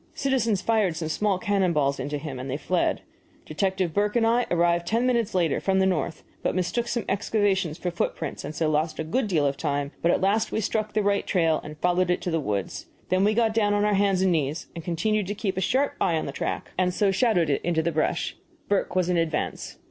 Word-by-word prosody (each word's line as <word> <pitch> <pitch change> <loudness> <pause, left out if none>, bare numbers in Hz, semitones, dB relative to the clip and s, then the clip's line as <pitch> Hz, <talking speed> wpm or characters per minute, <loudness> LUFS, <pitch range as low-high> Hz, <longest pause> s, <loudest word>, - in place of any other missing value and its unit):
Citizens 235 -8 0
fired 215 -7 +2
some 160 -1 -3
small 195 +4 +1
cannon 195 -4 +1
balls 140 -2 +1
into 145 +3 -3
him, 145 -3 -6
and 130 +2 -6
then 135 - -2
fled. 180 +3 0 0.4
Detective 185 +1 -1
Burke 205 +2 +1
and 235 -1 +3
I 235 +2 +2
arrived 170 0 +2
ten 230 +5 +1
minutes 235 -6 +1
later, 170 -5 +2
from 190 -1 +1
the 190 - +4
north, 170 -3 -1 0.2
but - - -1
mistook 185 +6 -1
some 235 -1 -2
excavations 195 -5 0
for 180 0 -3
footprints, 165 -3 -3
and 150 +2 -6
so 160 +1 0
lost 155 +1 0
a - - -2
good 215 +10 -1
deal 160 -7 +1
of 140 -1 0
time; 145 -2 -2
but 170 - +2
at - - +3
last 200 +3 +1
we - - 0
struck 215 0 -1
the 215 0 +1
right 200 0 +1
trail 165 -4 +2
and 150 0 -9
followed 180 +2 +1
it 180 - +2
to 175 - -3
the 165 - +1
woods. 100 - -3 0.2
We 185 - +4
then 210 +1 +3
got 225 -1 +2
down 205 -2 +2
on 205 0 +2
our 210 - +2
hands 195 -1 +2
and 190 - +3
knees 155 -1 -1
and 165 - -7
continued 205 +4 0
to 205 - -3
keep 195 -2 -2
a 190 - -1
sharp 265 +9 +1
eye 170 -4 +2
on - - -2
the - - -4
track, - - -4
and 180 -1 +2
so 200 +2 +2
shadowed 195 - +2
it 140 - 0
into 165 -2 0
the 170 - 0
brush. 155 -1 -1 0.3
Burke 200 -2 0
was 185 -2 +2
in 180 -1 +1
advance. 165 -2 -2
185 Hz, 240 wpm, -25 LUFS, 160-205 Hz, 0.4 s, the